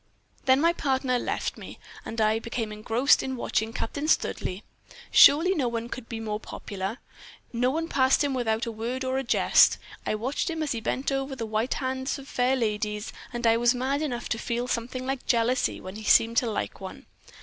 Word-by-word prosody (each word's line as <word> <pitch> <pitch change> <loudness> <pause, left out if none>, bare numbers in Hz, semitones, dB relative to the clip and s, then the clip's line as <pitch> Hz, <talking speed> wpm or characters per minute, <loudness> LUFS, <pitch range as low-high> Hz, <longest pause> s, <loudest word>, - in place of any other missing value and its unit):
"Then 260 0 +5
my 335 +3 +3
partner 265 -5 0
left - - -3
me, - - -10 0.3
and 225 - -6
I 215 0 +3
became 230 -1 -4
engrossed 225 +6 +2
in 265 0 -3
watching 225 -2 -1
Captain 285 +6 -4
Studleigh. 190 - 0 0.5
Surely 330 +6 +7
no 285 -9 0
one 235 0 -3
could 250 -2 -8
be 225 - -4
more 215 -1 -3
popular; 200 +1 -6 0.6
no 245 +2 +2
one 325 +4 -2
passed 265 -2 +3
him 285 -1 0
without 225 -3 0
a 230 - -4
word 235 +4 -4
or 260 +1 0
a - - -3
jest. 240 - +4 0.3
I - - -1
watched 255 - -2
him 320 -1 -2
as 300 - -2
he 230 - -2
bent 260 +5 -1
over 270 0 -2
the 235 -3 -4
white 220 +3 -1
hands 260 +1 -2
of 275 -1 -11
fair 255 0 +1
ladies, 210 -3 -2 0.2
and 240 -1 -4
I 230 0 +5
was 240 +1 +3
mad 270 +4 -1
enough 245 -6 -3
to 225 - -1
feel 240 +1 -2
something 250 +2 -3
like 265 0 -4
jealousy 240 +2 +1
when 185 +2 -8
he 215 - -8
seemed 230 +2 +4
to 240 - +3
like 210 - -4
one. 190 - -9
245 Hz, 205 wpm, -26 LUFS, 225-265 Hz, 0.6 s, Surely